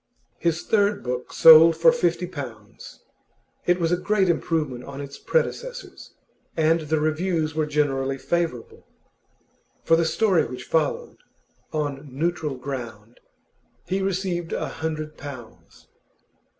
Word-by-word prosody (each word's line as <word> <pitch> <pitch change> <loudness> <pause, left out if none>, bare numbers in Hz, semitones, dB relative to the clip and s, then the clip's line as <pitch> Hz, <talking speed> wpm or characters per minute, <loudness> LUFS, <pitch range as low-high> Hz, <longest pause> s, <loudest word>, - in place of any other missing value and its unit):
His 170 -1 0
third 205 -1 +1
book 125 0 -4
sold 165 0 +8
for 170 +9 +6
fifty 175 -7 0
pounds. 125 - -10 0.6
It 175 0 +3
was 165 -1 0
a 175 - +3
great 195 0 +1
improvement 155 -7 -1
on 140 +1 -9
its 140 0 -8
predecessors, - - -3 0.4
and 160 +1 +3
the 155 0 -1
reviews 155 0 0
were 155 -1 -1
generally 135 -2 0
favourable. 165 -6 -3 1.0
For 165 - +4
the 165 0 +2
story 190 0 +2
which 125 +1 -8
followed, 155 -3 -1 0.5
'On 145 -2 -3
Neutral 155 0 -2
Ground,' 120 -4 -7 0.7
he 190 +1 -1
received 185 -3 -2
a - - -2
hundred 155 -1 -5
pounds. 130 -6 -11
160 Hz, 125 wpm, -24 LUFS, 140-175 Hz, 1.0 s, sold